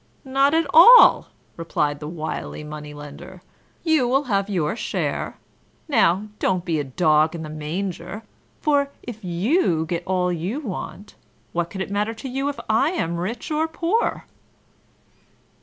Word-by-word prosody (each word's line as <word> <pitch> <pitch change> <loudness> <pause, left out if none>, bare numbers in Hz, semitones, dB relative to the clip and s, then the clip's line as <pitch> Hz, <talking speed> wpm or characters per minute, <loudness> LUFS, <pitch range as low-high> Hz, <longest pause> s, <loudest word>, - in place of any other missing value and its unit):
"Not 275 +3 +2
at 330 0 +2
all!" 470 +10 +8 0.3
replied 150 -3 -1
the 150 - -6
wily 155 -1 -5
Money 150 0 -8
lender; 150 +5 -11 0.4
"you 315 -7 +3
will 270 +3 +2
have 200 -5 -1
your 175 -2 -1
share! - - -3 0.5
Now, 210 - +3
don't 185 -2 0
be 165 -4 0
a - - -1
dog 155 +3 +2
in 165 - -6
the 155 - -7
manger, 170 +6 -5 0.4
for, 285 -2 +2
if 225 -3 -8
you 180 - +1
get 170 +1 -3
all 180 -1 +1
you 180 - -3
want, 205 -4 -7 0.4
what 170 0 -1
can 190 - -6
it 190 - -4
matter 210 +3 -1
to 225 - -7
you 270 +2 -2
if 285 - -6
I 220 +7 +3
am 170 - -2
rich 225 - -4
or 310 +1 +1
poor?" 340 +8 -1
190 Hz, 155 wpm, -22 LUFS, 165-270 Hz, 0.5 s, all